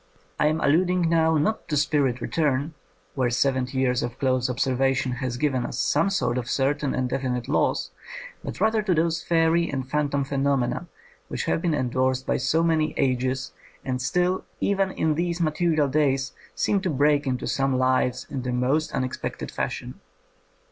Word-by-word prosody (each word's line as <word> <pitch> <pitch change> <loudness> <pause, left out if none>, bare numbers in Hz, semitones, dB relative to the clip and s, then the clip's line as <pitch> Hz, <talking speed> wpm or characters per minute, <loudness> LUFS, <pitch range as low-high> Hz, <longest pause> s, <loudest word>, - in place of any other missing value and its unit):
I 150 - +4
am 155 +1 0
allud 170 +6 +3
ing 180 -2 +1
now, 160 -1 +3
not 215 +9 0
to 150 -3 0
spirit 140 -4 +1
return, 150 0 0 0.4
where 130 -3 +1
seventy 130 +1 0
years 125 -2 +2
of 120 +1 -4
close 130 -2 +1
observation 130 +1 +1
has 125 -1 -3
given 130 -2 0
us 120 - -5
some 150 +7 +2
sort 125 -10 0
of 120 - -6
certain 140 +1 0
and 130 -1 0
definite 125 -2 -2
laws, - - 0 0.5
but - - -6
rather 220 0 +2
to 195 -4 +1
those 165 0 +1
fairy 165 0 +2
and 130 -2 -3
phantom 145 -1 0
phenomena 135 -2 0 0.4
which - - -3
have - - 0
been 170 -3 +1
endorsed 130 0 0
by - - +1
so 150 +6 +1
many 160 -2 +1
ages, 130 0 0 0.3
and 125 -1 -2
still 180 +8 +1 0.2
even 195 -1 +1
in 160 -4 0
these 170 +2 -1
material 155 -2 +1
days 135 -1 +1 0.2
seem 200 -2 +1
to 190 - -1
break 145 0 +2
into 130 -1 -1
some 135 -1 0
lives 130 -1 +1
in 135 - -4
the 125 0 -3
most 130 +6 +1
unexpected 130 -1 -3
fashion. - - -4
140 Hz, 170 wpm, -25 LUFS, 130-160 Hz, 0.5 s, I